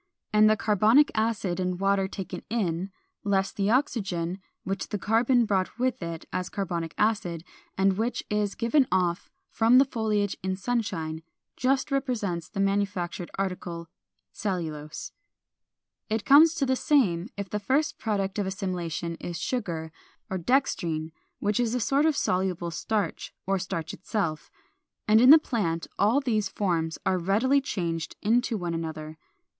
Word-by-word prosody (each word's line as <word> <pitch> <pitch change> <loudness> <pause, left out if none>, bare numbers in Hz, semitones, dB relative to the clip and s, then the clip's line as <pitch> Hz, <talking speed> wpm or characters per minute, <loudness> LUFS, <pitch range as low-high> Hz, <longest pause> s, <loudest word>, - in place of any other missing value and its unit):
And 215 0 +6
the 215 - +3
carbonic 220 +8 +4
acid 215 -5 0
and 180 -1 -1
water 195 0 +2
taken 190 -1 -6
in, 190 -5 -1 0.3
less 195 -1 +1
the 200 0 -1
oxygen 195 - 0 0.2
which 195 0 -3
the 210 - -3
carbon 230 +4 +3
brought 195 0 -1
with 255 -2 0
it 170 -1 -5
as 180 0 -2
carbonic 170 -4 -3
acid, 205 -7 0 0.3
and 190 +1 +2
which 235 +2 -1
is 210 -1 -1
given 250 +4 +2
off 180 0 0 0.2
from 230 +3 +5
the 270 - +7
foliage 215 -5 -1
in 190 0 -1
sunshine, 185 -8 -2 0.3
just 270 +2 +1
represents 220 - -1
the 200 - -6
manufactured 195 -3 -1
article, 180 -3 -4 0.4
cellulose. 160 -7 -4 1.0
453. 215 - +1
It 220 - -3
comes 310 +4 +7
to 285 - +1
the 260 0 +2
same 215 - +2
if 200 -2 -5
the 210 - -1
first 270 +8 0
product 200 -2 -1
of 200 - -1
assimilation 175 -4 -3
is 175 -1 -5
sugar, 170 -9 -3 0.4
or 190 - -1
dextrine 165 - 0 0.3
which 205 +1 0
is 240 -1 +1
a - - +1
sort 280 +6 +2
of 305 -2 +1
soluble 180 -2 0
starch, 210 +5 -2
or 195 0 +1
starch 165 -3 -4
itself. 185 -7 -3 0.6
And 215 +1 +6
in 250 - +7
the 310 - +12
plant 200 - -1
all 220 +7 +4
these 215 -7 0
forms 165 -6 -1
are 185 - +2
readily 225 +10 +2
changed 170 - -3
into 235 +2 +2
one 175 -3 -3
another. 160 -1 -5
195 Hz, 150 wpm, -27 LUFS, 175-230 Hz, 1.0 s, the